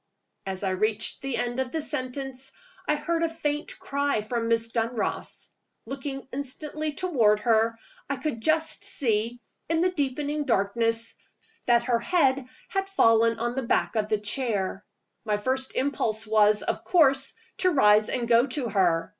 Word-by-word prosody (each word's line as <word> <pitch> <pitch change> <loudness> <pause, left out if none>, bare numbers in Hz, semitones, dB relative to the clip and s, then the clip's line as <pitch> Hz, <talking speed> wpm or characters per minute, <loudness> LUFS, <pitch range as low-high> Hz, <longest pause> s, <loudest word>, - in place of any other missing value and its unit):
As 190 0 -4
I 190 - 0
reached 215 +3 +1
the 270 -2 -2
end 240 +1 -2
of 260 -1 -2
the 320 - -1
sentence, 265 -2 -2 0.3
I 300 - +3
heard 330 +3 -1
a 335 - +1
faint 300 -2 -3
cry 280 -5 -1
from 230 +2 -2
Miss 230 0 +1
Dunross. 230 -1 -3 0.4
Looking 270 +2 -6
instantly 300 +3 -4
toward 245 - +2
her, 230 0 +2 0.3
I 280 - 0
could 270 -3 -4
just 315 +3 +2
see, 245 - -1 0.3
in 330 0 +1
the 365 +1 +2
deepening 295 -1 -2
darkness, 230 0 +1 0.5
t 240 - +5
hat 235 0 +4
her 240 -1 +1
head 270 -2 +1 0.2
had 390 0 -2
fallen 230 - +4
on 240 +1 -2
the 265 - -2
back 235 - 0
of 215 -1 0
the 215 - +2
chair. 210 -3 -2 0.4
My 210 -2 0
first 260 +5 -1
impulse 225 -5 -1
was, 210 -1 +3
of - - -3
course, 275 -6 +3 0.2
to 370 - +3
rise 215 -9 +4
and 240 -2 -2
go 235 +2 +4
to 255 -2 -1
her. 175 -5 +1
250 Hz, 165 wpm, -26 LUFS, 220-285 Hz, 0.5 s, t